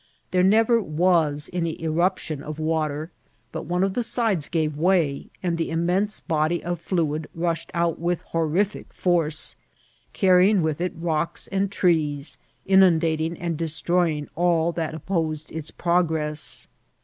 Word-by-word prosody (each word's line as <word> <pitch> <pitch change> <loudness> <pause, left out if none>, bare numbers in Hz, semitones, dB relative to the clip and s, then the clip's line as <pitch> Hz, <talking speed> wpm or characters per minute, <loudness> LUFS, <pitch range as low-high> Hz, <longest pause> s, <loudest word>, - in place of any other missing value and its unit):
There 180 0 +3
ncT^r 225 +3 +4
was 155 -3 +2
any 170 -3 -2
eruption 165 -2 -1
of 150 +1 -6
wa« 155 0 0
ter, 150 +3 -6 0.4
but - - -6
one 180 +2 +1
of 195 -1 0
the 245 - 0
sides 220 - 0
gave 155 -3 0
way, 160 -3 +1 0.2
and 170 -2 -1
the 165 - -1
immense 180 +6 0
body 160 +2 0
of 175 -1 -3
fluid 160 -4 -1
rushed 165 0 -2
out 170 -1 0
with 175 +1 -1
honi&o 165 +5 0
force, 165 -4 0 0.6
carrying 185 0 +4
with 155 0 -1
it 180 - -1
rocks 165 -1 -1
and 195 +1 0
trees, 155 -6 0 0.3
inundating 165 -4 +3
and 170 -2 -3
destroying 165 -1 0
all 170 -1 +2
that 160 -2 -3
op 160 - -10
posed 160 -5 -2
its 155 -1 -6
progress. 160 -3 -1
165 Hz, 145 wpm, -24 LUFS, 155-180 Hz, 0.6 s, ncT^r